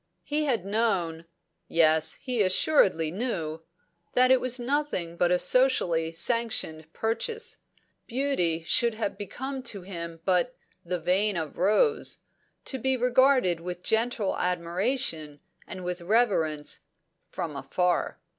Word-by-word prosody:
He 300 +1 -1
had 235 -10 0
known 195 -6 0 0.4
yes, 160 -1 +3
he 250 -4 -2
assuredly 185 - +3
knew 170 -7 -3 0.5
that 255 +1 +5
it 260 - +5
was 255 0 +2
nothing 245 - -1
but 175 0 +2
a 180 - +3
socially 175 -10 +2
sanctioned 165 -6 -1
purchase. 450 - -2 0.5
Beauty 230 -11 0
should 225 +7 +3
have 220 -2 -3
become 265 +6 -5
to 210 -7 -3
him 170 -3 -7
but 185 +7 +1 0.3
the 180 +1 -3
"vein 190 +4 +1
of 160 -3 -4
rose," 435 - +2 0.5
to 265 - -2
be 265 +2 +1
regarded 250 -7 +3
with 180 +1 -7
gentle 225 -2 0
admiration 175 - -1 0.3
and 185 - -7
with 180 0 -4
reverence, 170 -7 +1 0.5
from 155 -3 -5
afar. 175 +6 -1
190 Hz, 125 wpm, -27 LUFS, 170-250 Hz, 0.5 s, that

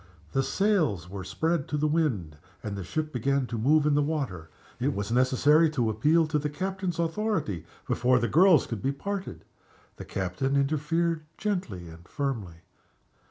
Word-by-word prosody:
The 135 - +2
sails 155 - +1
were 95 +1 -6
spread 140 - -1
to 150 - -2
the 150 - 0
wind, 140 - 0 0.3
and 105 -2 -4
the 100 - -5
ship 155 - -3
began 135 +2 +1
to 120 - -5
move 150 +6 +4
in 150 - +3
the 145 - +3
water. 135 - -3 0.3
It 135 +3 0
was 100 +2 -3
necessary 135 +6 +4
to 115 -3 +2
appeal 155 +10 +3
to 155 -1 0
the 150 +1 -2
captain's 185 +2 -3
authority 165 - -1 0.2
before 125 +1 +3
the 120 -1 +1
girls 170 - +5
could 115 -4 -5
be 135 +5 0
parted. 185 - -5 0.5
The - - -8
captain 95 +9 -2
interfered 155 +4 +1 0.2
gently 175 - -3
and 85 +2 -13
firmly. 110 - -4
140 Hz, 165 wpm, -27 LUFS, 105-160 Hz, 0.5 s, girls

